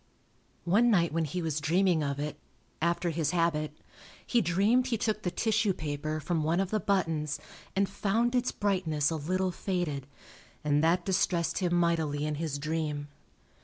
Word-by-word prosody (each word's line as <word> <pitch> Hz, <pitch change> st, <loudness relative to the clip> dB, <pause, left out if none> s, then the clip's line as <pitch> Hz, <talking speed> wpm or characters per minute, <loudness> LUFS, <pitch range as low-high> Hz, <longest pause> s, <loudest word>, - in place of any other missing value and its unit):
One 215 Hz, +8 st, +4 dB
night 170 Hz, -7 st, +3 dB
when 165 Hz, 0 st, +1 dB
he 175 Hz, +4 st, -3 dB
was 155 Hz, -2 st, -1 dB
dreaming 175 Hz, +2 st, +3 dB
of 140 Hz, -1 st, -2 dB
it, 150 Hz, +1 st, -3 dB, 0.5 s
after 170 Hz, +1 st, +1 dB
his 160 Hz, -2 st, 0 dB
habit, 155 Hz, -3 st, 0 dB, 0.5 s
he 240 Hz, -, +2 dB
dreamed 205 Hz, +8 st, +3 dB
he 240 Hz, -3 st, 0 dB
took 215 Hz, -1 st, -1 dB
the 180 Hz, -, -1 dB
tissue 220 Hz, +1 st, +1 dB
paper 155 Hz, 0 st, -3 dB
from 165 Hz, 0 st, -1 dB
one 165 Hz, +3 st, +1 dB
of 195 Hz, -1 st, -1 dB
the 215 Hz, -, +1 dB
buttons 165 Hz, -7 st, 0 dB, 0.4 s
and 195 Hz, +1 st, +2 dB
found 215 Hz, +5 st, 0 dB
its 250 Hz, 0 st, +1 dB
brightness 170 Hz, -7 st, 0 dB
a -, -, -1 dB
little 185 Hz, +5 st, 0 dB
faded, 175 Hz, -8 st, -2 dB, 0.6 s
and 150 Hz, 0 st, +2 dB
that 170 Hz, +2 st, +3 dB
distressed 175 Hz, -3 st, +1 dB
him 175 Hz, -2 st, +1 dB
mightily 160 Hz, -4 st, +1 dB
in 150 Hz, -, -1 dB
his 155 Hz, -4 st, -2 dB
dream. 150 Hz, -1 st, -2 dB
170 Hz, 165 wpm, -30 LUFS, 155-195 Hz, 0.6 s, One